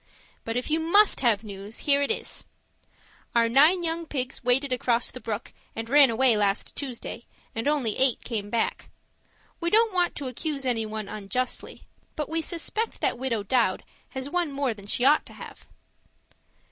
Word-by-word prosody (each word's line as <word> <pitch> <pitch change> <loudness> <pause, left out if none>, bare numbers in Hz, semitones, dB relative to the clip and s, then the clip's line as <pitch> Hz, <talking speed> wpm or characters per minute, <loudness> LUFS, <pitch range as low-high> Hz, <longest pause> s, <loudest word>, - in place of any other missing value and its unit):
But 225 +1 -2
if 250 +5 -3
you 315 - +2
MUST 395 +6 +5
have 230 -4 +2
news, 200 +1 -8
here 280 -1 +4
it 280 - 0
is: - - -3 0.9
Our 230 0 +4
nine 305 +9 +5
young 330 0 -2
pigs 260 -3 -3
waded 255 +2 +2
across 240 -1 0
the 255 - -9
brook 220 -1 -5 0.2
and 225 0 -5
ran 285 -2 +7
away 235 +1 +4
last 205 -1 0
Tuesday, 250 -3 -6 0.3
and 225 +4 -3
only 275 -8 +1
eight 260 -2 +3
came 210 -4 -4
back. 230 +1 -2 0.7
We 340 -1 0
don't 445 +1 +4
want 355 -1 +1
to 280 - -5
accuse 275 +2 -4
anyone 220 -4 -2
unjustly, 215 +5 -4 0.3
but 300 - -3
we 325 +1 0
suspect 375 +7 -3
that - - 0
Widow 235 -5 -1
Dowd 220 -3 +1 0.3
has 265 0 -5
one 345 0 -1
more 275 -3 -1
than 200 -2 -13
she 245 +4 0
ought 295 +3 +5
to - - -11
have. - - -12
255 Hz, 170 wpm, -26 LUFS, 225-300 Hz, 0.9 s, ran